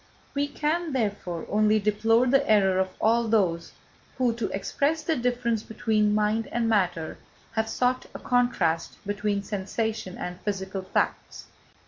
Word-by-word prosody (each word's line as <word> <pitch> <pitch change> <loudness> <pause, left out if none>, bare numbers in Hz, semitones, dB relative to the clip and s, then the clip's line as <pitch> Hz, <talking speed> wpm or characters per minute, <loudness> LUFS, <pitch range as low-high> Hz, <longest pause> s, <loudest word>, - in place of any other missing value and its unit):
We 285 0 0
can, 310 +2 -1
therefore, 200 -8 -2
only 215 +1 +3
deplore 225 +3 +3
the 275 +2 +2
error 190 -3 +4
of 190 0 +1
all 230 +1 +3
those 185 -7 +1 0.5
who, 250 -3 +2
to 230 -2 -3
express 290 +10 -1
the 320 +1 +1
difference 240 -2 0
between 215 -1 +1
mind 215 +1 +1
and 235 -1 0
matter, 180 -7 0 0.3
have 220 0 -1
sought 250 +2 0
a - - -2
contrast 195 -10 +1
between 205 0 -1
sensation 205 0 -3
and 180 0 -6
physical 195 -1 -3
facts. 185 - -2
215 Hz, 140 wpm, -26 LUFS, 195-240 Hz, 0.5 s, error